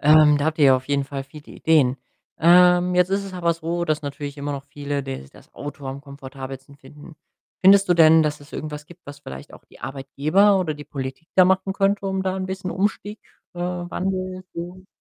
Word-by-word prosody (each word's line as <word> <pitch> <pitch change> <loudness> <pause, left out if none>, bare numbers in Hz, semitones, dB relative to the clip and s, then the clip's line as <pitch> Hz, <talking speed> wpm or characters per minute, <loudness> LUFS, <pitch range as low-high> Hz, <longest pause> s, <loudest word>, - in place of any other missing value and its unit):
Ähm, 150 0 +6
da 145 - -1
habt 160 0 -1
ihr 145 - +6
ja 130 - +6
auf 130 0 -8
jeden 140 -1 0
Fall 135 0 -6
viele 150 +2 -14
Ideen. 140 -5 +2 0.4
Ähm, 180 +1 +5
jetzt 180 +1 +3
ist 200 0 0
es 195 - -8
aber 170 -2 +1
so, 170 +1 -3
dass 155 -2 -1
natürlich 140 0 -6
immer 145 +1 -3
noch 140 0 -6
viele 145 0 -4
des 130 - -7
das - - -19
Auto 145 -1 -8
am 135 +1 -6
komfortabelsten 135 -1 -10
finden. 145 +3 -15 0.4
Findest 195 0 +6
du 175 - +4
denn, 160 -1 +6
dass 150 -1 -1
es 145 - -16
irgendwas 150 -1 -6
gibt, 175 +2 -16
was 145 0 -10
vielleicht 65 - -10
auch - - -15
die - - -20
Arbeitgeber 155 +9 +2
oder 155 -4 -2
die 145 0 -10
Politik 135 +2 -7
da 185 - +7
machen 190 +1 +1
könnte, 195 0 0
um 190 0 -1
da 190 0 -2
'n 190 -1 -3
bisschen 190 -1 -5
Umstieg 205 +2 -2 0.4
äh, - - -10
Wandel 185 +1 -3
zu 180 +2 -8
155 Hz, 210 wpm, -22 LUFS, 140-185 Hz, 0.4 s, da